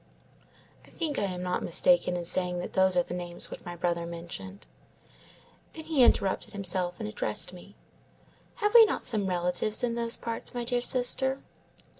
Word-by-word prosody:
"I - - -18
think 310 -4 -3
I 205 - +1
am 180 -2 -4
not 180 0 -1
mistaken 180 +1 +3
in 175 - -4
saying 180 +1 -1
that 175 - -5
those 190 -1 +3
are 175 - +4
the 175 - -7
names 175 -1 -7
which - - -9
my 175 - -7
brother 170 -1 -1
mentioned. 170 +3 -8 1.1
Then 315 -1 -9
he 315 -4 +1
interrupted 195 -5 +2
himself 180 -2 +1
and - - -4
addressed 105 +10 0
me:— 185 +3 -14 0.8
"'Have 420 -3 0
we 470 -1 +10
not 430 - -2
some 215 -5 +1
relatives 180 +5 0
in 240 -1 0
those 235 0 -2
parts, 230 +2 -5
my 240 - -2
dear 245 0 0
sister? 265 +2 0
190 Hz, 175 wpm, -28 LUFS, 175-240 Hz, 1.1 s, we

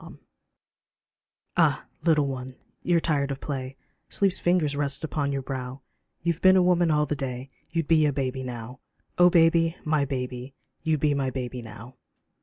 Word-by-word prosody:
LULLABY - - -12 1.4
AH - - +3 0.2
little 155 -4 +3
one, 130 -1 -5 0.3
you're 175 -1 +2
tired 145 -4 0
of 135 -1 -4
play, 135 -2 -5 0.3
Sleep's 195 -2 +1
fingers 170 -5 +2
rest 140 0 -1
upon 145 -2 -1
your 135 -1 -2
brow, 130 0 -5 0.4
You've 170 0 -1
been 185 0 +7
a 185 - +5
woman 175 -1 +3
all 150 -1 +3
the 150 - -2
day 130 -1 -5 0.2
You'd 165 -3 -2
be 155 -2 +4
a - - +2
baby 130 -1 -2
now; 125 0 -7 0.4
Oh 180 0 +8
baby, 165 0 +4
my 155 -2 +2
baby! 130 -1 -5 0.3
You'd 155 -3 0
be 150 -1 +3
my 135 -2 0
baby 125 -1 -5
new. 110 +2 -11
140 Hz, 170 wpm, -26 LUFS, 130-165 Hz, 1.4 s, Oh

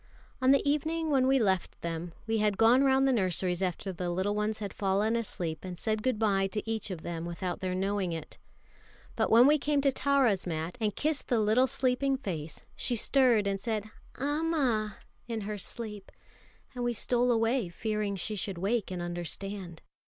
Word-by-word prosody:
On 260 - +4
the 275 +1 +4
evening 315 +2 0
when 260 -2 +3
we 270 +1 +4
left 190 -7 0
them, 170 +1 -4
we 225 0 0
had 210 -2 +1
gone 235 +5 +5
round 270 0 +4
the 265 - +3
nurseries 185 -3 0
after 190 +1 -2
the 175 0 -3
little 190 +4 0
ones 210 +1 -1
had 205 -3 -5
fallen 205 +3 +1
asleep, 175 -8 -2
and 180 -1 -6
said 215 +3 -1
goodbye 210 -5 +1
to 210 +3 -4
each 220 -1 -2
of 180 -4 -6
them 165 -1 -4
without 175 +1 -4
their 185 -1 -2
knowing 195 -1 -1
it; 160 -2 -7 0.8
but - - +1
when 235 +2 +7
we 300 +2 +5
came 290 0 +1
to 275 0 +3
Tara's 260 -9 +2
mat, 160 +1 -3
and 210 -2 0
kissed 305 -2 -1
the 240 - +2
little 220 +5 +4
sleeping 265 +1 +1
face, 165 - -5
she 245 - -1
stirred 240 -2 +3
and 195 0 0
said, 215 0 -3 0.3
"Amma!" 275 -8 0 0.3
in 230 -2 -3
her 210 0 -4
sleep; 210 -1 -6 0.6
and 245 -1 -4
we 240 0 +1
stole 245 +2 +1
away 230 -2 +1
fearing 210 +2 -2
she 210 +3 -3
should 195 -2 -4
wake 205 +4 0
and 180 -2 -4
understand. 175 +1 -5
215 Hz, 185 wpm, -30 LUFS, 185-250 Hz, 0.8 s, when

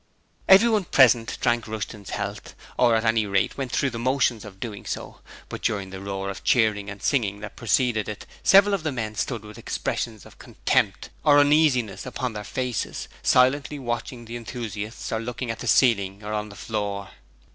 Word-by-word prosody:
Everyone 210 +1 +6
present 120 -6 +4
drank 120 -1 +1
Rushton's 105 -2 -6
health, - - -5 0.2
or 120 -2 +4
at 110 0 0
any 115 -2 +2
rate 100 -1 +1
went 135 -3 -4
through 140 +1 +1
the 115 - -5
motions 125 -3 +1
of 95 -3 -11
doing 105 -3 -6
so, - - -6 0.3
but - - -7
during 100 -3 -1
the 95 0 -7
roar 100 0 -4
of 95 - -9
cheering 105 -4 +2
and 105 -1 -9
singing 105 -7 +1
that 105 -1 -8
preceded 115 -1 +1
it 105 - -7 0.2
several 200 +1 +6
of 195 - 0
the 155 -1 -2
men 110 -5 -3
stood 115 0 -3
with 105 0 -11
expressions 110 -3 -3
of - - -16
contempt - - 0
or 145 -1 +6
uneasiness 145 -7 +3
upon 125 -1 -3
their 105 -1 -5
faces, 125 +2 -3
silently 140 +3 +3
watching 120 -1 -4
the 115 +1 -6
enthusiasts 115 -2 -6
or 110 - 0
looking 120 +1 -4
at 115 - -7
the - - -6
ceiling 100 -5 +3
or 105 +1 -4
on 105 0 -2
the 100 - -12
floor. 100 -1 -4
115 Hz, 185 wpm, -25 LUFS, 105-130 Hz, 0.3 s, Everyone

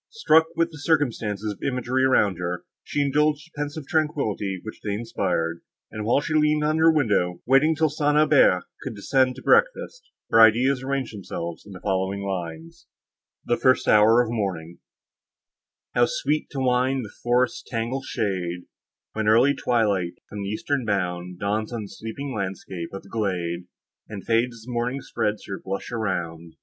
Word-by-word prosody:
Struck 160 - +4
with 165 0 +1
the 155 - -11
circumstances 115 -9 0
of - - -19
imagery 125 0 0
around 105 -9 +3
her, 90 0 -4 0.2
she 145 - -1
indulged 150 +1 +1
the 170 - -24
pensive 145 0 -4
tranquillity 135 - -1
which 110 - -9
they 105 - -2
inspired; 90 -7 -2 0.3
and 110 -1 -5
while 120 +5 +3
she 155 - -3
leaned 150 0 +3
on 155 +1 +1
her 165 0 +6
window, 100 - +1
waiting 135 +5 +4
till 160 +1 +2
St. 150 0 +1
Aubert 150 -11 +5 0.2
should 130 -6 -5
descend 130 +5 +1
to 130 - -11
breakfast, - - +2 0.2
her 115 - +6
ideas 125 +4 +5
arranged 135 -2 -2
themselves 85 -3 -6
in 100 - -10
the 90 - -9
following 95 +1 -1
lines: 85 -4 -6 0.6
THE 120 - +1
FIRST 130 -1 +3
HOUR 110 +3 +6
OF 115 - -5
MORNING 90 -7 -3 1.1
How 120 0 +4
sweet 150 +2 -1
to 135 - -5
wind 130 0 +1
the 105 - -11
forest's 120 +1 +1
tangled 125 +3 -3
shade, 90 -6 -2 0.5
When 110 -1 -2
early 120 +6 +5
twilight, 105 -10 0
from 105 - -7
the 100 - -3
eastern 135 +6 -1
bound, 90 -4 -2
Dawns 105 +3 -2
on 115 -3 -4
the - - -8
sleeping 130 +7 -6
landscape 95 -3 -5
in 95 - -6
the - - -16
glade, 90 -5 -2 0.4
And 100 -3 -7
fades 115 +1 +1
as - - -16
morning 125 +2 -2
spreads 105 -3 -2
her 95 - -6
blush 95 +4 -4
around! 85 -7 -3
115 Hz, 170 wpm, -24 LUFS, 95-135 Hz, 1.1 s, her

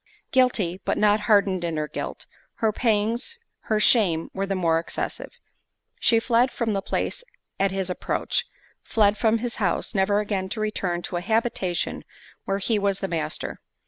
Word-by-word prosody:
Guilty, 215 -9 +2
but - - 0
not 210 0 +4
hardened 195 -4 +4
in 165 -2 -2
her 150 0 -1
guilt, - - -5 0.3
her 220 -1 +1
pangs, 230 - 0 0.3
her 215 -1 +1
shame 190 -8 +3
were 195 +1 -2
the 195 - -1
more 165 -3 +2
excessive. 165 - -4 0.7
She 230 - +4
fled 240 +2 +3
from 230 -4 -1
the 195 - 0
place 485 - -2 0.4
at 195 0 +3
his 190 -1 -2
approach; 180 - -1 0.3
fled 210 -2 +3
from 220 +1 +2
his 235 0 -4
house, - - -1
never 205 0 +2
again 200 -3 -2
to 220 - -3
return 185 -5 -1
to 175 - -3
a - - -2
habitation 210 -4 -1 0.4
where 195 - 0
he 210 +2 0
was 200 -1 +1
the 195 - -1
master. 165 -4 -3
205 Hz, 170 wpm, -25 LUFS, 185-225 Hz, 0.7 s, not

